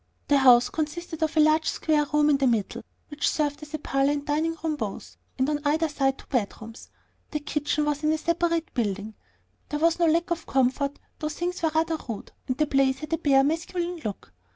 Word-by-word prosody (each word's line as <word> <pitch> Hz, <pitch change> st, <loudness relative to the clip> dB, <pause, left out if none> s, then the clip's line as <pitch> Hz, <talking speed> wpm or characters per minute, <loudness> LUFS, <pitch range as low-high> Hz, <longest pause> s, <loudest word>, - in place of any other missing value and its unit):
The 285 Hz, -1 st, +5 dB
house 250 Hz, -2 st, +6 dB
consisted 320 Hz, +1 st, -4 dB
of 315 Hz, 0 st, 0 dB
one 305 Hz, -1 st, +6 dB
large 310 Hz, +1 st, +3 dB
square 300 Hz, -2 st, +1 dB
room 300 Hz, 0 st, +4 dB
in 280 Hz, -, +4 dB
the 275 Hz, -1 st, +2 dB
middle, 225 Hz, -5 st, 0 dB, 0.3 s
which 295 Hz, -1 st, 0 dB
served 290 Hz, -1 st, -1 dB
as 300 Hz, +1 st, -7 dB
parlor 275 Hz, +1 st, +2 dB
and 290 Hz, -1 st, -4 dB
dining 315 Hz, +3 st, 0 dB
room 315 Hz, -2 st, 0 dB
both, -, -, -6 dB, 0.2 s
and 260 Hz, 0 st, +1 dB
on 300 Hz, 0 st, 0 dB
either 310 Hz, +2 st, +2 dB
side 270 Hz, -3 st, 0 dB
two -, -, -14 dB
bedrooms. 225 Hz, -2 st, -4 dB, 0.4 s
The 300 Hz, -, -2 dB
kitchen 300 Hz, 0 st, -1 dB
was 295 Hz, 0 st, -1 dB
in 305 Hz, -, +3 dB
a 315 Hz, -, +1 dB
separate 335 Hz, 0 st, 0 dB
building. 210 Hz, -2 st, -2 dB, 0.6 s
There 295 Hz, +2 st, -2 dB
was 335 Hz, +2 st, +2 dB
no 340 Hz, -, +4 dB
lack 335 Hz, +2 st, +1 dB
of 330 Hz, -1 st, -2 dB
comfort, 270 Hz, +2 st, +1 dB, 0.2 s
though 305 Hz, -, -2 dB
things 350 Hz, +4 st, -3 dB
were 325 Hz, -, +2 dB
rather 320 Hz, 0 st, +1 dB
rude, 215 Hz, -3 st, -6 dB, 0.2 s
and 255 Hz, -, -1 dB
the 305 Hz, -, +3 dB
place 270 Hz, -2 st, +2 dB
had 305 Hz, +3 st, -6 dB
a 325 Hz, -, +1 dB
bare, 270 Hz, -2 st, +4 dB
masculine 340 Hz, +3 st, -2 dB
look. 195 Hz, -, -6 dB
300 Hz, 210 wpm, -26 LUFS, 270-320 Hz, 0.6 s, house